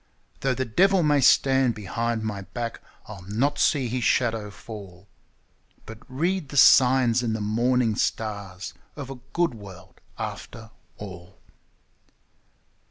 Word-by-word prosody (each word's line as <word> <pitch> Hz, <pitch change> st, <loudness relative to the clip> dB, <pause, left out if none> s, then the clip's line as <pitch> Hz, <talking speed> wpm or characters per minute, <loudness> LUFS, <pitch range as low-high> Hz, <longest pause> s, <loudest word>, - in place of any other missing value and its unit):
Though 135 Hz, -1 st, 0 dB
the 130 Hz, +2 st, -2 dB
devil 185 Hz, -, +3 dB
may 145 Hz, -2 st, +3 dB
stand 130 Hz, -2 st, +4 dB
behind 115 Hz, +2 st, -3 dB
my 105 Hz, -2 st, -3 dB
back, 115 Hz, +3 st, -6 dB, 0.2 s
I'll 105 Hz, -3 st, -10 dB
not 115 Hz, +10 st, -1 dB
see 135 Hz, -4 st, +2 dB
his 125 Hz, +1 st, -2 dB
shadow 115 Hz, -4 st, +1 dB
fall, 100 Hz, -3 st, -11 dB, 0.8 s
But 110 Hz, 0 st, -10 dB
read 165 Hz, +4 st, -1 dB
the 145 Hz, -, -5 dB
signs 125 Hz, -2 st, +6 dB
in 115 Hz, -2 st, -1 dB
the 110 Hz, -, -2 dB
morning 115 Hz, +2 st, +1 dB
stars 100 Hz, -4 st, -3 dB, 0.2 s
of 140 Hz, -3 st, -7 dB
a 135 Hz, -, -8 dB
good 170 Hz, -5 st, +1 dB
world 95 Hz, -4 st, -13 dB, 0.2 s
after 110 Hz, 0 st, -7 dB, 0.3 s
all. 95 Hz, -2 st, -10 dB
115 Hz, 130 wpm, -25 LUFS, 105-130 Hz, 0.8 s, signs